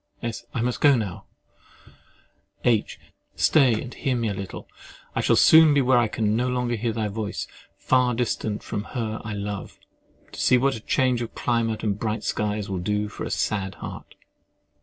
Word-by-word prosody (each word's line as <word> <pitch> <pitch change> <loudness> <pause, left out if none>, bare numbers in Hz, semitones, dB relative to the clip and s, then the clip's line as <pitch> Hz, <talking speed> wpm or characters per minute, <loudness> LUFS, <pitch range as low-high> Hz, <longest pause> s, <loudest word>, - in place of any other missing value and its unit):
— - - -31
S. 115 -2 -4
I 115 - -2
must 125 +1 -1
go 145 -2 +6
now. 105 -7 -4 1.4
H. 115 -4 +1 0.4
Stay, 130 -8 +4
and 125 +1 -7
hear 130 -2 -1
me 115 -2 -1
a - - -2
little. 95 -1 -7 0.5
I - - 0
shall - - +3
soon 160 -2 +7
be 140 - +4
where 130 -1 +4
I 120 - +2
can 105 0 0
no 125 +2 0
more 125 -1 -1
hear 115 0 -1
thy 110 -1 -2
voice, 105 0 -4 0.3
far 125 -2 +2
distant 110 -3 -2
from 105 - -4
her 110 -2 -3
I 110 - -5
love, 100 -1 -5 0.5
to - - -9
see 125 - +5
what 130 -3 -1
change 130 -2 +2
of 115 - -6
climate 115 -2 -1
and 105 -2 -1
bright 110 0 -2
skies 105 -1 -2
will 95 -2 -3
do 105 +3 -1
for - - -6
a - - -4
sad 95 -3 -1
heart. - - -9
115 Hz, 185 wpm, -24 LUFS, 105-125 Hz, 1.4 s, soon